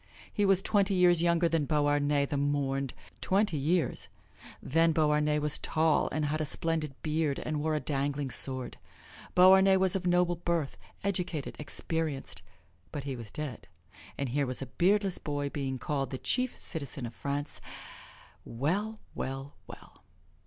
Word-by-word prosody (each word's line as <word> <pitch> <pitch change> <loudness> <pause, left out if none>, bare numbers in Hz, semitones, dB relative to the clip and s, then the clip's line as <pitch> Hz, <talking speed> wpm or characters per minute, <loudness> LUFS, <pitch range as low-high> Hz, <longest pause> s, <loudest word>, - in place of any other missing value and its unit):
He 205 -1 +2
was 195 -1 +3
twenty 200 -2 +2
years 175 -2 +5
younger 170 0 +3
than 165 -3 +1
Beauharnais, 145 -1 +2
the 145 - -3
mourned 140 -2 -1 0.3
twenty 195 -2 +1
years! 160 +2 0 0.5
Then 165 +3 +2
Beauharnais 150 -1 +2
was 150 0 0
tall 160 -1 +2
and 155 +1 -1
had 155 +2 -1
a - - +1
splendid 155 -2 -2
beard 155 -2 0
and 155 -1 -3
wore 155 0 0
a - - +1
dangling 140 -1 -1
sword. 130 -1 +1 0.6
Beauharnais 190 +1 +7
was 190 -1 +3
of 185 -1 -1
noble 175 -1 +2
birth, 170 -4 -1 0.3
educated, 180 -6 -2
experienced, 150 -1 -3 0.5
but 145 - -5
he 135 -1 -4
was 115 -3 -8
dead; 145 -1 -6 0.5
and 140 -2 -2
here 140 +2 0
was 130 - -2
a 135 - -4 0.2
beardless 195 +1 +3
boy 145 -1 -3
being 135 -2 -3
called 135 +1 -2
the 130 - -4
Chief 250 - 0
Citizen 140 -6 -4
of 115 - -7
France. 145 +3 -3 0.8
Well, 195 - -2
well, 135 +2 -5
well! - - -13
150 Hz, 150 wpm, -30 LUFS, 140-175 Hz, 0.8 s, Beauharnais